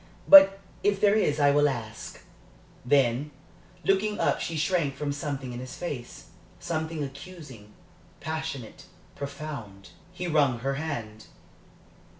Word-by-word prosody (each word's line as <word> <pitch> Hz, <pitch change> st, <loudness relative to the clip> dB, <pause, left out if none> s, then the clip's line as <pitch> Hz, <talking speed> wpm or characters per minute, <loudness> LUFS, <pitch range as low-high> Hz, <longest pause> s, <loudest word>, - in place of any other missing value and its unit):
But 195 Hz, -10 st, +9 dB, 0.2 s
if 205 Hz, -1 st, +2 dB
there 205 Hz, 0 st, +4 dB
is 155 Hz, -9 st, +1 dB
I 145 Hz, -1 st, +5 dB
will 145 Hz, +1 st, +4 dB
ask." 115 Hz, -4 st, -7 dB, 0.6 s
Then, 135 Hz, +1 st, +2 dB, 0.5 s
looking 205 Hz, +2 st, +1 dB
up, -, -, +1 dB
she 165 Hz, -, -3 dB
shrank 155 Hz, -4 st, 0 dB
from 145 Hz, 0 st, -3 dB
something 140 Hz, -3 st, -4 dB
in 120 Hz, -, -6 dB
his 130 Hz, 0 st, -8 dB
face 140 Hz, -9 st, -7 dB, 0.3 s
something 160 Hz, -1 st, -3 dB
accusing, 140 Hz, -, -10 dB, 0.5 s
passionate, 155 Hz, -6 st, -5 dB, 0.3 s
profound. 140 Hz, -9 st, -7 dB, 0.2 s
He 180 Hz, 0 st, -6 dB
wrung 145 Hz, -7 st, +2 dB
her 135 Hz, +2 st, -1 dB
hand. 120 Hz, -8 st, -5 dB
145 Hz, 125 wpm, -27 LUFS, 130-165 Hz, 0.6 s, But